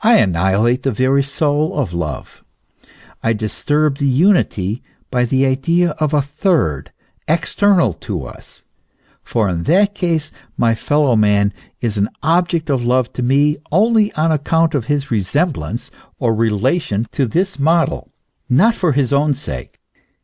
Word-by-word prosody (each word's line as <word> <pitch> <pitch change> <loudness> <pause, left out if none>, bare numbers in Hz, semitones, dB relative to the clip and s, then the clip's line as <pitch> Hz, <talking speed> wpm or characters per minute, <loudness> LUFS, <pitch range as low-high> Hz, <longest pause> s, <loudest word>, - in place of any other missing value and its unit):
annihilate 105 - +3
the 135 - 0
very 130 +4 +2
soul 145 +2 -1
of 110 -12 -2
love, 80 -4 -6 0.8
I 115 - +1
disturb 140 +7 -1
the 140 - +1
unity 130 - +1 0.3
by 125 -1 +1
the 130 +2 +1
idea 165 +6 +1
of 155 -2 0
a 150 -2 +2
third 140 - -1 0.4
external 170 - +2
to - - -6
us; - - -14 0.6
for 110 -3 -1
in 85 -3 -2
that 200 +4 +3
case 165 -5 -2 0.3
my 115 -1 +2
fellow 145 +2 +1
man 105 -1 +2 0.3
is 115 -3 -2
an 100 +1 +1
object 165 -1 +1
of 130 -3 0
love 125 0 0
to - - -5
me 140 +4 +2
only 215 +4 +3
on 160 +1 +1
account 160 +2 +1
of 135 -6 -1
his 145 0 -2
resemblance 120 - -2 0.3
or 120 -4 0
re 115 +1 +1
lation 110 - -1
to 135 - 0
this 185 - -1
model, 165 +3 +1 0.4
not 190 - +4
for 175 -7 0
his 135 -1 0
own 145 0 +2
sake. 65 - -7
140 Hz, 150 wpm, -17 LUFS, 115-160 Hz, 0.8 s, not